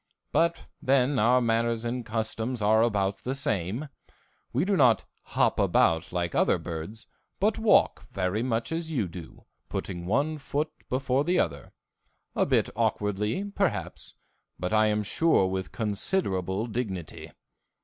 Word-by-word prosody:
But, 170 0 +1 0.2
then, 130 0 +3
our 125 +3 +4
manners 115 0 +1
and 120 +1 -2
customs 115 +2 -3
are 110 +1 +4
about 100 -4 +1
the 130 +2 -4
same. 110 - -2 0.6
We - - +1
do 200 0 +2
not 125 - +4 0.3
hop - - +3 0.5
like 85 -1 -2
other - - +3
birds, 85 +7 -7 0.3
but 210 +3 +1
walk 220 -1 +3
very 95 +2 -1
much 115 0 -1
as 165 0 -3
you 120 - 0
do, 85 -1 -11 0.2
putting 85 -2 -4
one 145 +9 +1
foot 150 +2 -2 0.2
before 130 +1 +1
the 180 +4 +1
other, 70 - -1 0.6
a - - +2
bit - - +2
awkwardly, 105 - -1
perhaps, 195 -5 -2 0.4
but 90 +3 -3
I 110 0 +4
am 105 0 +1
sure 160 0 +3
with 95 0 -3
considerable 100 - -1
dignity. 105 -8 -5
115 Hz, 140 wpm, -27 LUFS, 95-140 Hz, 0.6 s, our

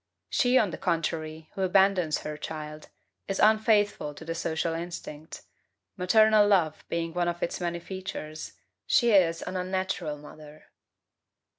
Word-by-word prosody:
She, 255 -2 +3
on 210 -7 +3
the - - -7
contrary, 160 -1 -2
who 195 - -5
abandons 190 -3 +3
her 150 0 -5
child, 155 0 -7 0.4
is 195 - -2
unfaithful 210 -7 +3
to - - -10
the 165 - -3
social 165 0 -1
instinct, 165 -2 -7 0.5
maternal 215 +3 +5
love 170 -7 +2
being 165 -1 -2
one 175 0 0
of 175 0 -2
its 170 - -3
many 170 -1 -2
features; 170 -4 -7 0.3
she 235 -3 +4
is 175 -5 +4
an 185 - -5
unnatural 185 -4 -2
mother. 150 +1 -14
175 Hz, 140 wpm, -28 LUFS, 155-195 Hz, 0.5 s, maternal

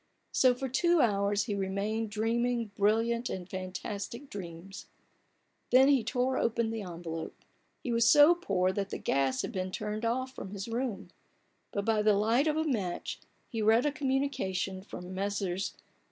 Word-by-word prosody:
So 255 -1 +4
for 265 +2 -3
two 345 +6 +3
hours 200 -4 +2
he 215 - -3
remained 200 +3 -2
dreaming 230 +1 0
brilliant 225 +4 +2
and 180 -2 -5
fantastic 200 +7 -6
dreams, 185 0 -8 0.8
Then 265 +2 +6
he 270 -5 +4
tore 255 +3 0
open 230 -1 0
the 225 -1 -3
envelope. 170 -3 -6 0.5
He 245 - -2
was 230 -1 +4
so 295 +3 +8
poor 190 - 0
that 195 0 -3
the - - -4
gas 135 -1 0
had - - -3
been 185 0 -3
turned 215 +3 -4
off 255 +3 -1
from 195 - -7
his 200 +1 -5
room, 225 -6 -3 0.6
but 200 -1 -2
by 220 -1 +2
the 210 -1 +4
light 225 +8 +2
of 305 0 +1
a 315 - +2
match 210 - -2 0.3
he 225 -3 -3
read 225 +4 +4
a 295 - +2
communication 260 -10 -1
from 185 -1 -8
Messrs. 195 -1 -2
215 Hz, 165 wpm, -30 LUFS, 195-245 Hz, 0.8 s, so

